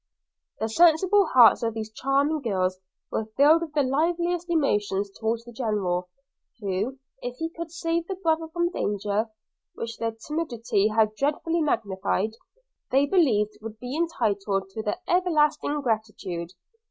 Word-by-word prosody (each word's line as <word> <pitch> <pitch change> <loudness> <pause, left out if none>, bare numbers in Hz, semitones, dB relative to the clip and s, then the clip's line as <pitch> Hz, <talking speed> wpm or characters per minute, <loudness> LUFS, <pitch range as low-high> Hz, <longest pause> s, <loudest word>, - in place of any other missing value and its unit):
The 220 - 0
sensible 345 - +4
hearts 245 -6 +7
of 225 -1 -1
these 220 -1 -5
charming 280 +6 +1
girls 185 -6 0 0.3
were 220 - -2
filled 305 +4 +6
with 320 -3 -5
the 295 -2 +3
liveliest 340 +5 0
emotions 205 - +1
towards 225 +2 -2
the 240 - -10
General, 195 -7 -1 0.5
who, 205 +6 -2 0.2
if 245 0 -5
he 325 0 -3
could 335 -1 -7
save 330 0 -1
their 385 - -4
brother 325 -3 0
from 345 +2 -1
danger, 205 - -1 0.5
which 230 0 -6
their 230 -1 -1
timidity 235 -10 0
had 215 0 +2
dreadfully 305 +7 0
magnified, 215 -6 0 0.6
they 270 +2 +4
believed 245 - +2
would 220 0 -8
be 250 +2 -5
entitled 200 - -1
to 220 - -4
their 210 +6 -2
everlasting 305 -4 +2
gratitude. 210 - -3
245 Hz, 140 wpm, -26 LUFS, 210-320 Hz, 0.6 s, hearts